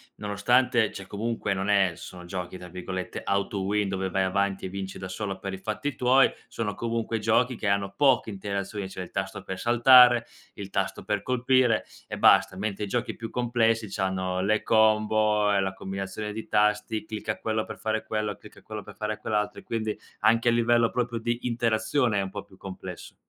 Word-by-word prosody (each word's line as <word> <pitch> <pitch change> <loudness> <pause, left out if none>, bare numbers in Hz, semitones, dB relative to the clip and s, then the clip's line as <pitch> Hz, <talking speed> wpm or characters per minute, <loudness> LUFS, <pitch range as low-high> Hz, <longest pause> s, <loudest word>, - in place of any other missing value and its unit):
nonostante, 120 +2 +2
cioè 95 - -9
comunque 105 +1 -2
non 95 +1 -3
è 100 -3 +3
sono 90 +1 -10
giochi, 90 0 -5
tra 90 0 -10
virgolette, 90 +1 -5
"auto-win", 100 +1 0
dove 95 0 -2
vai 95 +1 +1
avanti 100 +1 0
e - - -4
vinci 95 0 -6
da 95 - -7
solo 95 0 -4
per 95 0 -5
i 95 - -5
fatti 110 +8 -3
tuoi, 130 +2 +4 0.2
sono 105 -3 -3
comunque 115 -1 -2
giochi 115 +3 +2
che 110 - -3
hanno 100 0 0
poche 135 -5 +3
interazioni, 100 0 -4
cioè 95 -1 -6
il 90 - -12
tasto - - -4
per 95 - -6
saltare, 120 0 +7 0.3
il 100 -1 -8
tasto 95 -1 -2
per 105 -1 -1
colpire 125 -2 +2 0.2
e - - -5
basta, - - +5
mentre 105 +1 -3
i - - -8
giochi 120 +4 -2
più 115 - -6
complessi 115 -3 +1
c'hanno 95 -1 -1
le 105 +3 +1
combo 110 -1 +3
e 100 - +3
la 95 0 -1
combinazione 95 +2 -5
di 110 +1 -7
tasti, 105 +1 +1
clicca 110 0 -4
quello 110 -1 -1
per - - -8
fare 110 0 -2
quello, 105 -2 -2
clicca - - -15
quello - - -7
per - - -12
fare 105 0 -3
quell'altro 105 -1 -2
e - - -15
quindi 110 -2 -3 0.2
anche 115 +2 +3
a - - +6
livello 120 0 +3
proprio 120 -1 -2
di 120 +1 -2
interazione 115 0 +1
è - - +2
un 95 - -3
po' 100 +1 -6
più 100 -1 -19
complesso. 95 -2 -9
105 Hz, 195 wpm, -27 LUFS, 95-115 Hz, 0.3 s, saltare